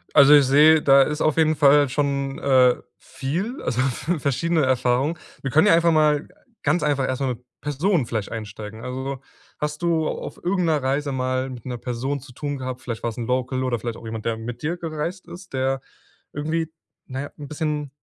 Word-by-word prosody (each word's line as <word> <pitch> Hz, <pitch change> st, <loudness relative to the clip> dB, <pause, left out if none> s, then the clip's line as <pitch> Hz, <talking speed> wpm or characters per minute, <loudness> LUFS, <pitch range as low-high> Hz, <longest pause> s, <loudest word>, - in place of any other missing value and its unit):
Also, 145 Hz, 0 st, +9 dB
ich 145 Hz, -, +6 dB
sehe, 150 Hz, +4 st, +6 dB
da 140 Hz, 0 st, +7 dB
ist 150 Hz, +2 st, 0 dB
auf 155 Hz, 0 st, +2 dB
jeden 155 Hz, -1 st, +3 dB
Fall 145 Hz, -1 st, +5 dB
schon, 140 Hz, -1 st, -1 dB
äh, 130 Hz, -2 st, +4 dB, 0.2 s
viel 180 Hz, -, -4 dB
also, 125 Hz, +1 st, 0 dB
v 150 Hz, +6 st, -1 dB
verschiedene 150 Hz, +4 st, +1 dB
Erfahrungen. 130 Hz, +4 st, +1 dB, 0.2 s
Wir 135 Hz, -, -2 dB
können 155 Hz, +4 st, +4 dB
ja -, -, +6 dB
einfach 170 Hz, 0 st, +4 dB
mal 150 Hz, -2 st, +3 dB, 0.3 s
ganz 155 Hz, +4 st, +1 dB
einfach 140 Hz, -3 st, +1 dB
erst 130 Hz, +1 st, -2 dB
mal 135 Hz, -, +1 dB
mit 125 Hz, 0 st, -5 dB, 0.2 s
Personen 150 Hz, +2 st, +1 dB
vielleicht 110 Hz, -3 st, -3 dB
einsteigen. 110 Hz, 0 st, -7 dB
Also, 130 Hz, +1 st, -4 dB, 0.4 s
hast 150 Hz, +2 st, -3 dB
du 165 Hz, -2 st, +1 dB
auf -, -, -5 dB
irgend 180 Hz, 0 st, +1 dB
'ner 150 Hz, -4 st, +1 dB
Reise 140 Hz, +2 st, 0 dB
mal 130 Hz, 0 st, -1 dB
mit 125 Hz, -3 st, -9 dB
'ner 125 Hz, -2 st, -4 dB
Person 130 Hz, +4 st, -3 dB
zu 130 Hz, 0 st, -14 dB
tun 145 Hz, +3 st, -4 dB
gehabt? 130 Hz, 0 st, -5 dB
Vielleicht 115 Hz, -3 st, -5 dB
war 120 Hz, -, -1 dB
es 115 Hz, -, -9 dB
'n 120 Hz, -, -3 dB
Local 130 Hz, +1 st, -1 dB
oder 125 Hz, -3 st, -1 dB
vielleicht 115 Hz, +1 st, -4 dB
auch -, -, -12 dB
jemand, 110 Hz, -1 st, -6 dB
der 115 Hz, -1 st, 0 dB
mit 115 Hz, +2 st, -7 dB
dir 165 Hz, +4 st, -2 dB
gereist 165 Hz, +2 st, -4 dB
ist, 180 Hz, +1 st, -11 dB
der 130 Hz, 0 st, 0 dB, 0.5 s
irgendwie, 160 Hz, +2 st, -2 dB, 0.4 s
na 130 Hz, +1 st, -4 dB
ja, 145 Hz, -, -6 dB
'n 145 Hz, -, -7 dB
bisschen 150 Hz, -1 st, -2 dB
140 Hz, 205 wpm, -23 LUFS, 125-155 Hz, 0.5 s, Also